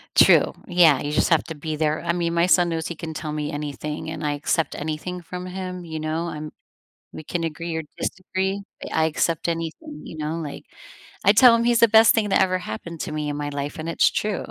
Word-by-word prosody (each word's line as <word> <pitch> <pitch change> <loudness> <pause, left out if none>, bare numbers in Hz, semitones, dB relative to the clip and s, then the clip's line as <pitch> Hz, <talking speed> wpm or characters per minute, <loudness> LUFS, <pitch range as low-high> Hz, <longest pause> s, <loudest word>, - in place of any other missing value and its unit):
True, - - +6
yeah, 175 -5 +5
you 145 - -3
just 150 - +2
have 165 -3 +4
to 160 - -7
be 155 +1 -4
there, 155 0 0
I 170 - 0
mean, 170 -1 -1
my 170 0 +3
son 175 0 +4
knows 160 -2 -2
he 170 - -5
can 160 0 -6
tell 155 0 -5
me 150 0 -3
anything, 150 +1 -5
and 160 -1 -5
I 150 - +1
accept 155 +2 -1
anything 160 +4 -4
from 180 +2 -7
him 185 -1 -6
you 160 -1 -5
know, 155 +2 -2
I'm 150 -2 -6 0.6
we - - -8
can 175 +3 -3
agree 165 +1 -4
or 160 - -2
disagree, 190 +1 -2 0.2
but - - -7
I 160 - +3
accept 165 +1 -1
anything 170 - -4
you - - -9
know, 155 +1 -2
like, 145 -3 -7 0.6
I 200 - +7
tell 235 +2 +7
him 230 0 +2
he's 235 -1 +3
the 230 - +7
best 220 +1 +7
thing 220 -2 +1
that - - +4
ever 185 -1 +1
happened 165 +2 -7
to - - -5
me 150 -1 -3
in 145 - -2
my 145 0 -3
life, 145 0 -4
and 160 +1 -5
it's 165 - +3
true. 210 -3 -2
165 Hz, 235 wpm, -23 LUFS, 155-180 Hz, 0.6 s, I